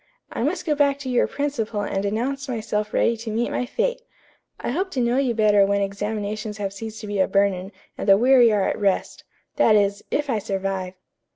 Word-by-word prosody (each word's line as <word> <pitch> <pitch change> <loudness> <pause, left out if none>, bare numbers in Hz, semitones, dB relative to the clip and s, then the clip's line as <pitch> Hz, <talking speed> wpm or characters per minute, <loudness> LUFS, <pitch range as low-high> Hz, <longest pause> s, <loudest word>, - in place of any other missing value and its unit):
I - - -4
must - - -1
go 310 - +2
back 285 -1 +2
to 280 -2 -6
your 245 - +3
principal 235 -7 -2
and 195 -1 -2
announce 265 +7 -2
myself 215 -3 -2
ready 235 - +2
to 225 0 -7
meet 230 +2 -1
my 250 - -2
fate. - - -1 0.6
I - - -3
hope 375 +8 -1
to 265 - -1
know 240 +1 +1
you 260 -4 +1
better 210 -2 +4
when 200 0 +1
examinations 210 +1 -4
have 200 -2 -3
ceased 220 +2 -7
to - - -7
be 205 -1 -2
a 190 - +3
burden 195 -1 +1 0.3
and - - -2
the 195 - +8
weary 245 0 +5
are 205 -2 +2
at - - -2
rest. 200 -2 -1 0.3
That 230 -7 +5
is, 200 -1 +1
if 295 0 -1
I 230 -5 0
survive." 190 -2 -3
215 Hz, 210 wpm, -23 LUFS, 200-255 Hz, 0.6 s, the